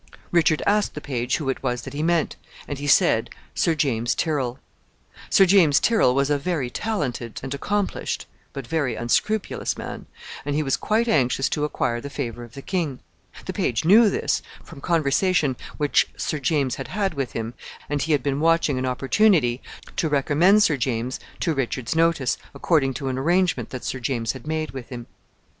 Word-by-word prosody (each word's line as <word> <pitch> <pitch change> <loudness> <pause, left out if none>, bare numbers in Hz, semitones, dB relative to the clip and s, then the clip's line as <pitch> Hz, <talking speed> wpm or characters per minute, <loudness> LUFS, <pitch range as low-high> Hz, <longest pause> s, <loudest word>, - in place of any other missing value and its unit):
Richard 160 -3 +3
asked 210 0 +1
the - - -4
page 125 -4 -2
who 150 -4 -5
it 135 - -1
was 125 -2 -2
that 135 - -8
he 145 - -3
meant, 165 0 +1 0.3
and 145 -2 -5
he 145 - -4
said 140 - +4 0.2
Sir 165 - +1
James 120 -6 0
Tyrrel. 135 -6 -1 0.7
Sir 195 - +6
James 175 -7 +5
Tyrrel 220 - +3
was 140 +1 +1
a 145 - +2
very 145 -5 -2
talented 130 - -3
and 135 0 -4
accomplished, 205 +7 -2 0.3
but 135 -3 -7
very 140 -4 -1
unscrupulous 190 - -1
man, - - -7 0.4
and 145 0 -2
he 155 - +1
was 135 -2 +1
quite 225 +2 0
anxious 135 - +2
to 150 -1 -1
acquire 120 -5 -1
the 140 - -6
favor 120 -4 -5
of 120 +2 -13
the 140 - -8
king. 165 -9 -2 0.5
The - - -4
page 115 +5 -1
knew 210 +5 +7
this, - - 0 0.2
from 140 - -12
conversation 160 -2 +2 0.2
which 145 -1 +2
Sir 155 - -2
James 140 -2 0
had - - -5
had 195 -1 -1
with 135 -4 -3
him, 115 +1 -4 0.3
and 145 -1 -1
he 160 - +1
had 140 -4 +1
been 140 -1 -1
watching 165 -4 +2
an 130 - -1
opportunity 135 - +2 0.4
to 160 - +1
recommend 155 +8 +4
Sir 150 -6 +2
James 125 0 -2 0.2
to 165 - +1
Richard's 130 -1 -2
notice, 165 -6 +2 0.2
according 135 -6 +1
to 140 - -4
an 130 0 -2
arrangement 175 -5 +1
that 130 - -7
Sir 130 - -3
James 120 -2 -1
had 130 +2 -10
made 155 0 -2
with 130 -3 -8
him. 120 -2 -7
140 Hz, 185 wpm, -23 LUFS, 130-165 Hz, 0.7 s, knew